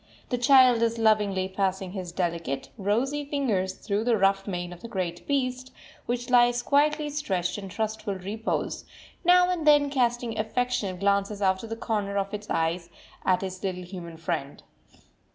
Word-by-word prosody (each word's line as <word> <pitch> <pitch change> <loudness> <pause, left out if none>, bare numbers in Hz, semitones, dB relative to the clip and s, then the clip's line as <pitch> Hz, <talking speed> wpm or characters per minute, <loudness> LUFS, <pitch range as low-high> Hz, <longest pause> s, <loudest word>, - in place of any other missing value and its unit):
The 245 - 0
child 255 -2 +6
is 230 0 +1
lovingly 210 -4 +2
passing 190 -1 -2
his 185 -3 -5
delicate, 170 -6 -2
rosy 235 +8 0
fingers 240 -11 -1
through 205 0 -2
the 240 -2 +3
rough 195 0 +2
mane 175 -2 -4
of 175 - -13
the - - -7
great 180 -5 -4
beast, 255 -2 -1 0.4
which 245 +1 -2
lies 240 0 +4
quietly 295 +1 +2
stretched 195 - -2
in 195 -1 -7
trustful 220 0 -3
repose, 205 +4 -3 0.4
now 360 +1 +5
and 330 -4 -2
then 290 -1 +5
casting 240 -4 0
affectionate 220 -5 -1
glances 200 +1 +1
out 190 -1 +2
of 225 - -8
the 225 - -3
corner 205 -3 -2
of 200 +1 -2
its 210 0 -6
eyes 170 +1 -1 0.4
at 185 0 +2
its 185 -1 -5
little 185 -2 -3
human 175 -2 -8
friend. 160 -4 -4
205 Hz, 165 wpm, -27 LUFS, 185-245 Hz, 0.4 s, child